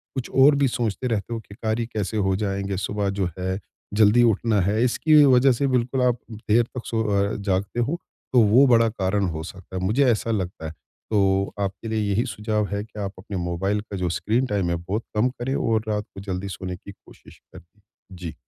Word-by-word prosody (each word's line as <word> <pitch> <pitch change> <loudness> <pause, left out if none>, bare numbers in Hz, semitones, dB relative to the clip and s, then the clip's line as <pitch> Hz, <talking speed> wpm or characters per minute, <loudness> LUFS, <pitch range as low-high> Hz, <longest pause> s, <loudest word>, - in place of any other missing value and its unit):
कुछ 130 -2 -4
और 140 +2 +7
भी 140 -1 +3
सोचते 120 0 -2
रहते 115 0 -2
हो 115 - -3
कि 100 -2 -14
कार्य 110 +1 -1
कैसे 110 +1 -2
हो 95 -2 +1
जाएँगे? 100 -1 -2
सुबह 100 +1 -1
जो 95 -2 -1
है 95 +2 -2 0.3
जल्दी 110 +3 +5
उठना 110 -1 +2
है। 105 +6 +1
इसकी 150 +4 +5
वजह 130 0 +5
से 135 +3 +1
बिल्कुल 125 0 0
आप 125 -1 +2 0.2
देर 110 +2 +2
तक 120 +1 -8
सो 110 -1 -1
अ, 100 0 +1
जागते 100 +2 -2
हो 145 +9 -1 0.3
तो 125 - +6
वो 115 +6 +6
बड़ा 115 -2 +5
कारण 100 -1 0
हो 80 -1 -5
सकता 95 +2 -10
है। 90 - -3
मुझे 120 +9 +2
ऐसा 115 +1 -1
लगता 90 -6 -3
है, 80 - -4 0.4
तो 100 -1 +2
आपके 100 +3 -3
लिए 110 0 0
यही 110 +5 +1
सुझाव 105 -1 -1
है 100 0 -2
कि 110 -1 -11
आप 100 -1 -3
अपने 95 0 -6
मोबाइल 95 +4 -1
का 100 -2 -7
जो 90 -1 -1
स्क्रीन 115 +8 0
टाइम 100 -5 0
है 85 - +1
बहुत 95 +7 -3
कम 110 +4 +3
करें 130 +2 -4
और 110 -1 +1
रात 105 -1 -1
को 95 - -7
जल्दी 95 0 -4
सोने 95 -1 -5
की 100 +3 -12
कोशिश - - -18
करें। 90 +5 -16 0.4
जी। 85 -3 -6
105 Hz, 215 wpm, -24 LUFS, 95-115 Hz, 0.4 s, और